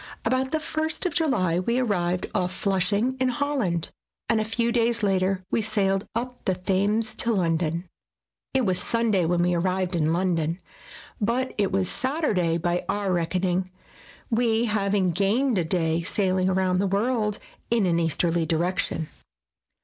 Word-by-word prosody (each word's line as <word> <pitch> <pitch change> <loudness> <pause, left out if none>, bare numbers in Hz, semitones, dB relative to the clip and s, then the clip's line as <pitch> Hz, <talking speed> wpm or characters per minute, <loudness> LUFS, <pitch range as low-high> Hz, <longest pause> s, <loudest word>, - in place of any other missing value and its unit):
About 260 +1 +1
the 315 - 0
first 315 +2 -2
of 360 - 0
July 190 - +1
we 235 +7 0
arrived 180 -7 0
off 180 0 0
Flushing 200 +5 0
in 260 - +2
Holland 250 - -1 0.4
and 220 - +2
a - - +1
few 235 +2 0
days 235 -1 +1
later 190 -1 +1
we - - +2
sailed 200 -2 0
up 245 +1 -4
the 190 - +1
Thames 200 +4 0
to 235 - +1
London. 170 -3 0 0.7
It 260 -2 +3
was 185 -2 0
Sunday 225 -6 +1
when 175 +1 +2
we 180 0 +2
arrived 185 +1 0
in 160 -1 +1
London, 170 -2 0 0.6
but 245 +5 0
it 200 -2 0
was 190 -1 +1
Saturday 215 - 0
by 175 +1 -1
our 200 -2 0
reckoning, 180 +2 0 0.6
we 230 0 +2
having 200 -4 +1
gained 205 +6 +1
a - - +1
day 165 -1 +1
sailing 185 0 +1
round 185 0 +1
the 200 - +1
world 210 +1 0 0.3
in 230 -4 +2
an 170 -2 +2
easterly 165 +1 +1
direction. 165 -1 -1
195 Hz, 155 wpm, -25 LUFS, 175-230 Hz, 0.7 s, It